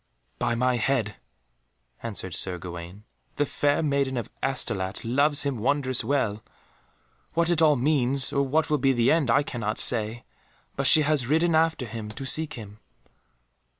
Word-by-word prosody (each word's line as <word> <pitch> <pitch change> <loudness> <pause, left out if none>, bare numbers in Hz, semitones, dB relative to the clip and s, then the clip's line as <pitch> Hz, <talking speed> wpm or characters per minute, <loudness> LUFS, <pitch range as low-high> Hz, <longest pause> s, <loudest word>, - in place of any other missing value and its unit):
"By 115 - 0
my 125 +1 +1
head," 115 -4 -1 0.8
answered 100 -5 -5
Sir 90 0 -2
Gawaine, 85 +3 -9 0.3
"the 145 - +1
Fair 145 +2 0
Maiden 140 -3 0
of 115 - -5
Astolat 105 -9 -2
loves 140 +5 +2
him 140 -5 -2
wondrous 130 +1 +1
well. 115 -7 -1 0.9
What 170 +1 +2
it 165 -2 +2
all 155 -2 +5
means, 135 -1 +1
or 140 - +2
what 150 +3 0
will 150 - +2
be 135 0 +2
the 120 -1 +2
end, 155 -6 +1
I 140 +5 +3
cannot 110 -6 -4
say, 115 0 +2 0.5
but 135 0 0
she 155 +3 +6
has 145 -5 +1
ridden 165 +4 +2
after 160 -4 +1
him 110 -1 -7
to 120 +5 -8
seek 155 +3 +2
him." 105 -3 -10
130 Hz, 160 wpm, -25 LUFS, 110-145 Hz, 0.9 s, she